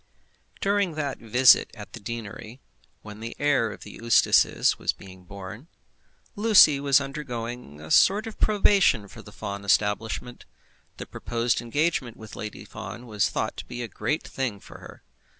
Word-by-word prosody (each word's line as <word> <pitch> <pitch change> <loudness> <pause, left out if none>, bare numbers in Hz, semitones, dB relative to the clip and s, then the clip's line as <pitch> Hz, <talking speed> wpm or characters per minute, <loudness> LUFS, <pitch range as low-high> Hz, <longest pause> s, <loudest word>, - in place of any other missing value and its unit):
During 200 -4 +1
that 145 -3 -3
visit 125 +3 +5
at 105 -2 -11
the 120 - -8
deanery, 110 +2 -7 0.4
when 105 0 -10
the 115 +1 -7
heir 140 -6 +1
of - - -11
the 105 - -10
Eustaces 115 -1 +3
was - - 0
being 95 -1 -14
born, 100 - -9 0.7
Lucy 200 -9 +6
was 140 -1 +4
undergoing 125 - -6
a 75 +1 -10
sort 205 +4 +5
of 225 - -9
probation 195 - +3
for - - -12
the - - -14
Fawn 100 0 -6
establishment. 105 +4 -1 0.5
The - - -6
proposed 115 0 -2
engagement 130 -1 -1
with 110 -1 -11
Lady 105 -1 -7
Fawn 110 +4 -9
was 105 -3 0
thought - - -3
to - - -7
be 120 0 -6
a - - -4
great 150 +6 -3
thing 125 -7 -3
for - - -13
her. - - -13
120 Hz, 160 wpm, -25 LUFS, 105-145 Hz, 0.7 s, Lucy